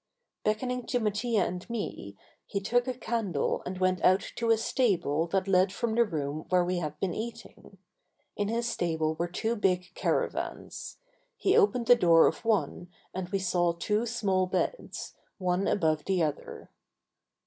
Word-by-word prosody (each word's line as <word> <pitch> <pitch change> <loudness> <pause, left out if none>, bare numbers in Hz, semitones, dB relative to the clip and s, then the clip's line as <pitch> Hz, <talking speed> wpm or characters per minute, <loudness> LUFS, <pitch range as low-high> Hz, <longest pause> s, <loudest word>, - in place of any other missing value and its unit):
Beckoning 250 +3 -1
to 245 - +1
Mattia 215 -1 +1
and 180 +5 -5
me 150 - -5 0.3
he 200 - -2
took 245 +5 +1
a 255 - 0
candle 220 - -1
and 185 +1 -4
went 185 -1 +1
out 185 +1 +3
to 230 0 0
a 225 - +5
stable 175 - +1
that 190 +2 0
led 185 0 +4
from 230 +2 -2
the 235 +1 +4
room 155 -4 -4
where 180 -1 +3
we 180 0 -1
had 150 -3 -5
been 185 -3 -1
eating. 225 -3 -8 0.6
In 205 - -1
this 230 +2 -1
stable 160 -8 0
were 170 +2 -2
two 220 +6 -2
big 185 -4 0
caravans. - - -3 0.4
He 400 -3 +2
opened 335 - +3
the 245 - +8
door 170 -7 +6
of - - 0
one 210 -5 0 0.2
and 185 -1 -4
we 200 - 0
saw 175 -2 +1
two 210 +7 -1
small 195 -6 +1
beds, - - -3 0.2
one 185 +1 0
above 155 -5 +1
the 185 -3 +1
other. 150 -2 -4
195 Hz, 165 wpm, -29 LUFS, 175-230 Hz, 0.6 s, the